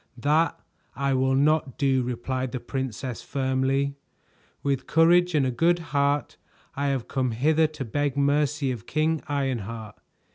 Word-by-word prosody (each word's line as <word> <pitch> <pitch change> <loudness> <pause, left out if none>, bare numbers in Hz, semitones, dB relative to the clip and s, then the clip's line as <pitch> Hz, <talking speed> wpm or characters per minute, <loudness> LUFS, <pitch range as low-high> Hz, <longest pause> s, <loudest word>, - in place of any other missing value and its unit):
"That 150 +5 +2 0.4
I 140 0 0
will 130 0 +2
not 145 -1 +2
do," 135 -2 +2
replied 125 +1 -3
the 130 - -2
princess 130 0 -4
firmly. 135 +1 0 0.7
"With 135 -2 -1
courage 175 +1 +4
and 140 -3 +3
a 130 - 0
good 170 +8 +3 0.2
heart, 140 +1 +1 0.4
I 140 +1 -1
have 135 -4 -1
come 130 -2 -1
hither 155 +6 +3
to 150 -3 -7
beg 145 +3 -1
mercy 145 0 +1
of 120 -5 -7
King 155 0 0
Ironheart. 115 -7 -3
140 Hz, 145 wpm, -26 LUFS, 130-150 Hz, 0.7 s, courage